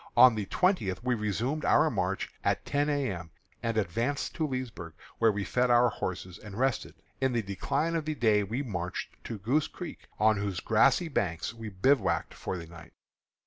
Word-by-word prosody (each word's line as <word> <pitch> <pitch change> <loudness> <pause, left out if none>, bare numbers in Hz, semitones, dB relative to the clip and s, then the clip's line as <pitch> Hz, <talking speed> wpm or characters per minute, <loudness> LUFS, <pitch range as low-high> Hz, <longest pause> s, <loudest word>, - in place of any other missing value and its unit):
On 130 -2 +9
the 105 -3 -3
twentieth 120 - +1
we 125 0 +1
resumed 115 - -1
our - - +4
march - - -1 0.2
at - - 0
ten 145 +1 +1
A. 145 -2 +1
M., 85 -3 -6 0.3
and 115 -1 -1
advanced 115 +8 -1
to 155 - -1
Leesburg, 120 - -5 0.3
where 115 -1 +5
we 100 -1 -2
fed 125 +4 +1
our 120 0 +6
horses 90 -3 -5
and 105 -2 -9
rested. 130 -2 0 0.3
In 130 -1 +2
the 120 -2 0
decline 140 - -1
of 160 -2 -1
the 155 0 -2
day 110 -5 +3
we 115 +8 -2
marched 90 -7 -4
to 115 - -4
Goose 135 +10 +1
Creek, 175 - -9
on 110 0 +4
whose 100 -3 -2
grassy 135 - +3
banks 90 - -1
we 115 -1 -7
bivouacked 130 +9 +2
for 95 - -4
the 85 - -7
night. 85 0 -13
115 Hz, 185 wpm, -29 LUFS, 100-135 Hz, 0.3 s, On